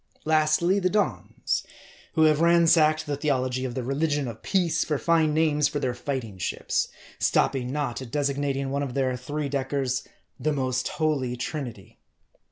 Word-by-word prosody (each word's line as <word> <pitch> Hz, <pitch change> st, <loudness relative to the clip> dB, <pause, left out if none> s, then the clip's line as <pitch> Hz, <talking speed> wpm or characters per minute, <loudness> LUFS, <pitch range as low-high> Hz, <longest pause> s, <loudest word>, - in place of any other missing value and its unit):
Lastly, 155 Hz, +4 st, +3 dB
the 185 Hz, -1 st, +1 dB
Dons; 205 Hz, +2 st, -1 dB, 0.5 s
who 160 Hz, -, +3 dB
have 155 Hz, 0 st, +4 dB
ransacked 165 Hz, -2 st, +4 dB
the 145 Hz, -, -2 dB
theology 130 Hz, -3 st, 0 dB
of 120 Hz, -2 st, -4 dB
the 130 Hz, -, -2 dB
religion 145 Hz, +1 st, 0 dB
of 115 Hz, -2 st, -7 dB
peace 180 Hz, -4 st, +1 dB
for 150 Hz, -, -1 dB
fine 160 Hz, 0 st, +2 dB
names 150 Hz, -1 st, +2 dB
for 145 Hz, +1 st, -3 dB
their 130 Hz, -3 st, -1 dB
fighting 120 Hz, -6 st, -4 dB
ships; 90 Hz, -, -1 dB, 0.3 s
stopping 125 Hz, -2 st, +1 dB
not 140 Hz, -4 st, -2 dB
at 130 Hz, -, -8 dB
designating 140 Hz, 0 st, -1 dB
one 140 Hz, +1 st, -1 dB
of 135 Hz, -3 st, -4 dB
their 130 Hz, -2 st, +1 dB
three 145 Hz, +4 st, -4 dB
deckers, 135 Hz, -1 st, -1 dB, 0.4 s
The 150 Hz, +4 st, 0 dB
Most 130 Hz, -2 st, -1 dB
Holy 140 Hz, -6 st, -1 dB
Trinity. 125 Hz, -6 st, -6 dB
140 Hz, 160 wpm, -26 LUFS, 130-155 Hz, 0.5 s, have